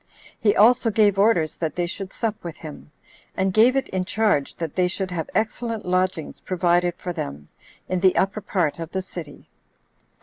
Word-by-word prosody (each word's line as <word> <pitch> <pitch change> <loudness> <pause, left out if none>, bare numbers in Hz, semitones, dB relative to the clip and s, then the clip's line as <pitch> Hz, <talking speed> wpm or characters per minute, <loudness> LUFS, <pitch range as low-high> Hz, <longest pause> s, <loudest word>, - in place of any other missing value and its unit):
He 205 -2 +3
also 235 +2 +5
gave 205 -2 +3
orders 195 -7 +3
that 160 -3 -3
they 175 - 0
should 185 +2 -6
sup 220 -2 -3
with 170 -2 -7
him; 155 -2 -10 0.5
and 190 0 +1
gave 235 +5 +5
it 270 - 0
in 185 -1 -1
charge 205 -8 0
that 165 -3 -4
they 180 -1 +2
should 185 +1 -3
have 165 -3 -3
excellent 225 +1 -1
lodgings 185 -3 -1
provided 175 -1 +1
for 180 0 -5
them 70 - -6 0.4
in 185 - -1
the 185 0 +4
upper 200 +3 +1
part 180 -6 -1
of 165 0 -6
the 190 0 -2
city. 175 -5 -10
185 Hz, 180 wpm, -23 LUFS, 170-210 Hz, 0.5 s, also